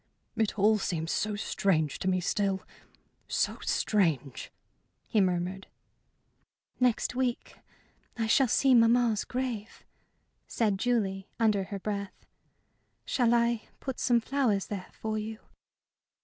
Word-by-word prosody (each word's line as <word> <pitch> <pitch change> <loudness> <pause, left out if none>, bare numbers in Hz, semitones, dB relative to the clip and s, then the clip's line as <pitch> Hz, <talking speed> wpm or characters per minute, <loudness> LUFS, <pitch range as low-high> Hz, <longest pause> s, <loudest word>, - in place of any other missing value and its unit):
"It 220 -2 0
all 215 +2 +4
seems 165 -4 -2
so 210 -1 -1
strange 170 -7 0
to - - -3
me 185 -1 +2
still 195 +1 0 0.6
so - - 0
strange!" 160 - 0 0.6
he 215 - +2
murmured. 185 +1 -1 1.1
"Next 250 -2 +2
week 250 -1 -2 0.6
I 225 - 0
shall 255 +4 +4
see 265 +3 +3
mamma's 230 -2 +4
grave," 245 -4 -4 0.6
said 210 -4 0
Julie, 195 -6 0
under 210 -4 +2
her 200 - -5
breath. 200 -1 -5 0.8
"Shall 240 -3 +2
I 235 -1 +1
put 265 -2 -5
some 240 -2 +3
flowers 235 -5 0
there 195 -3 -6
for 215 0 -3
you?" 220 +1 -5
215 Hz, 120 wpm, -29 LUFS, 195-235 Hz, 1.1 s, all